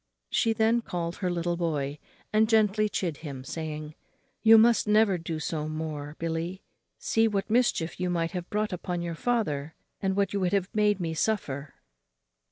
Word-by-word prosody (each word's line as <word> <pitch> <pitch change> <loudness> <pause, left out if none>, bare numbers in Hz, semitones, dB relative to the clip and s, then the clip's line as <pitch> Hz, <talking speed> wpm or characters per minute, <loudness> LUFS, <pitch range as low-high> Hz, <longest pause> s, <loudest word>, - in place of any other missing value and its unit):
She 225 - +2
then 225 +2 +2
called 170 -5 -4
her 185 - -1
little 175 0 -1
boy 150 -4 -2 0.3
and 215 0 +4
gently 215 -1 +3
chid 170 -7 -2
him, 140 -5 -7
saying, 155 +1 -5 0.5
"You 225 0 +8
must 230 0 +5
never 210 -3 +4
do 165 -1 -4
so 155 -1 -3
more, 155 -2 -5
Billy; 165 +1 -2
you 190 - -14 0.4
see 225 0 +2
what 205 -1 -2
mischief 225 -9 +1
you 180 0 0
might 165 -1 0
have 180 -2 -5
brought 210 -1 -1
upon 175 -1 -3
your 170 -1 -3
father, 160 -8 -1 0.3
and 190 -1 0
what 200 0 +1
you 200 - 0
have 185 +1 0
made 210 -2 +2
me 165 -2 -2
suffer." 155 -7 -2
180 Hz, 175 wpm, -28 LUFS, 160-210 Hz, 0.5 s, You